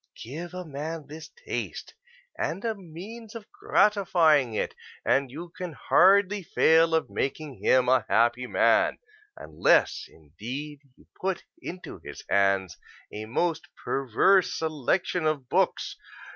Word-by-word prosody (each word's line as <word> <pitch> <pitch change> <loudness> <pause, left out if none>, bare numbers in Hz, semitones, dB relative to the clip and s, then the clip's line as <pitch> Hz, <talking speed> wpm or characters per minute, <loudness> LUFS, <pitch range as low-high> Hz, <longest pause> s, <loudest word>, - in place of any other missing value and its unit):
Give 165 +9 -7
a 180 0 -6
man 155 +1 -6
this 155 +2 -10 0.2
taste - - -5 0.4
and 185 +7 -3
a 225 - 0
means 205 +5 -10
of 225 -2 -8
gratifying 185 - +3
it, - - -2 0.3
and 135 -1 +2
you 165 +7 -8
can 180 -3 -6
hardly 200 +5 +4
fail 165 -1 +3
of 160 - -1
making 140 0 -4
him 130 -1 +4
a 130 +1 +3
happy 120 +2 +2
man; - - +3 0.4
unless, - - +2
indeed, 125 - -8 0.2
you - - -22 0.2
put 190 -1 -2 0.2
into 180 - -8
his - - -10
hands 95 -2 +1 0.4
a 105 +1 -5
most 160 +8 -1 0.2
perverse 135 - +2
selection 160 +2 -1
of 145 -5 -1
books. - - 0
160 Hz, 130 wpm, -27 LUFS, 130-185 Hz, 0.4 s, hardly